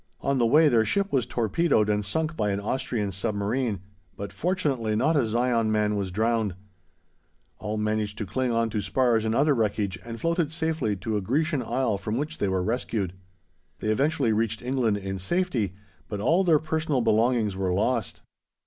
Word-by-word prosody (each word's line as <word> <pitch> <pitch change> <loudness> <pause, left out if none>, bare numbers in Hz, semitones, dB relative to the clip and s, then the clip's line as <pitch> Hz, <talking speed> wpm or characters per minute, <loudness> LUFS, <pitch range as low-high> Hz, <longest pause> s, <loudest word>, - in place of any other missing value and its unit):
On 140 -1 +1
the 120 - +4
way 155 +6 +6
their 115 -5 +4
ship 200 - 0
was 125 -4 +2
torpedoed 120 - +1
and 105 0 +1
sunk 155 +11 -1
by 105 -5 0
an 100 0 -1
Austrian 110 -1 -2
submarine, 105 +2 -1 0.4
but 100 0 -6
fortunately 135 - 0
not 155 +9 +2
a 135 -6 +2
Zion 115 -1 +1
man 105 -1 +1
was 100 -2 -2
drowned; 110 0 0 1.0
all 105 0 -3
managed 105 -1 -1
to 105 - -3
cling 125 +6 -1
on 115 -1 +1
to 105 -1 -1
spars 115 +1 +1
and 110 +1 0
other 145 +3 +4
wreckage 105 -5 -1
and 115 0 -7
floated 165 -2 0
safely 160 -9 -1
to 105 +3 -2
a - - -1
Grecian 145 - 0
isle 120 -3 -1
from 105 +3 -3
which 150 +3 -3
they 100 - +1
were 95 -1 0
rescued. 105 -4 -2 0.6
They 110 - -3
eventually 135 0 +2
reached 110 +1 -1
England 125 -5 +1
in 95 -1 -4
safety, 110 - -1 0.3
but 105 - -4
all 165 - +3
their 165 -4 +5
personal 155 -3 -1
belongings 115 -2 +2
were 95 -1 -1
lost. 110 +5 -1
115 Hz, 180 wpm, -26 LUFS, 105-135 Hz, 1.0 s, way